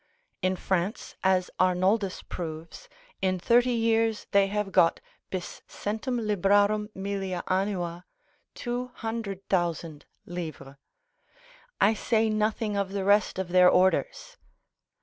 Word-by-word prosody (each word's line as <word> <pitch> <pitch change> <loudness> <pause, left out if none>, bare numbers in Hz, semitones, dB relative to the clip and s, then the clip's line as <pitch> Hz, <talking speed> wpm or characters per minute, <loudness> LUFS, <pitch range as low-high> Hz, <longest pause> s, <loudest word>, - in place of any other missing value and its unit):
In 185 0 +1
France, 190 +3 -2
as 185 -1 +2
Arnoldus 185 +2 +1
proves, 165 - -7 0.3
in 185 -1 +1
thirty 240 +7 +3
years 225 -1 +1
they 200 -1 +4
have 205 0 -2
got 165 -2 +4 0.3
bis 185 -2 -6
centum 220 +3 -3
librarum 205 +1 +2
millia 195 -2 -3
annua, 185 -2 -1 0.5
200,000_l_. 180 - -4 1.0
I 205 +3 +5
say 220 0 +1
nothing 215 0 0
of 200 -1 -2
the 195 -1 -2
rest 205 -1 +3
of 190 -2 -3
their 180 0 +6
orders. - - +1
195 Hz, 105 wpm, -27 LUFS, 180-215 Hz, 1.0 s, their